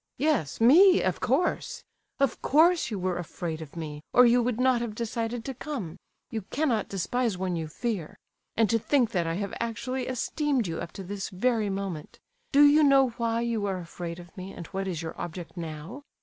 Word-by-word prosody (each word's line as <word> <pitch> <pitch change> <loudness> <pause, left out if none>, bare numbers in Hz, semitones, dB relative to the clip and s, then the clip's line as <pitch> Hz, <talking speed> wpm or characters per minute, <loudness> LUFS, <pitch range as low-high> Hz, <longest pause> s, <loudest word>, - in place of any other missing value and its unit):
"Yes, 265 - 0
me, 355 +11 +7
of 185 - 0
course! 275 +9 0 0.4
Of 275 -4 +1
course 325 +1 +4
you 215 - -3
were 180 -1 -1
afraid 165 -1 -5
of 155 -1 -10
me, 150 -3 -6
or 250 - +8
you 240 +1 +5
would 240 -1 -1
not 255 -2 +3
have 230 -3 -4
decided 230 0 -3
to 270 - -3
come. 245 - -6 0.3
You 220 - -2
cannot 265 -7 0
despise 220 +2 -1
one 185 -1 -2
you 160 -1 -3
fear. 185 0 -4 0.4
And 225 -1 +4
to 230 - +3
think 245 -1 +2
that 175 -5 0
I 165 - -1
have 200 +1 -3
actually 250 +3 -3
esteemed 260 0 0
you 165 -2 -3
up 170 - -6
to 195 - -7
this 195 +1 -5
very 220 +2 0
moment! 195 -5 -5 0.3
Do 285 +1 +6
you 295 +2 +6
know 275 -3 +5
why 230 0 +1
you 230 -3 -1
are 190 -1 -1
afraid 170 -1 -6
of 175 +2 -13
me, 190 0 -7
and 170 - -8
what 195 0 -2
is 170 -3 -3
your 160 - -5
object 175 +1 -7
now? 165 - -7
220 Hz, 200 wpm, -27 LUFS, 175-255 Hz, 0.4 s, or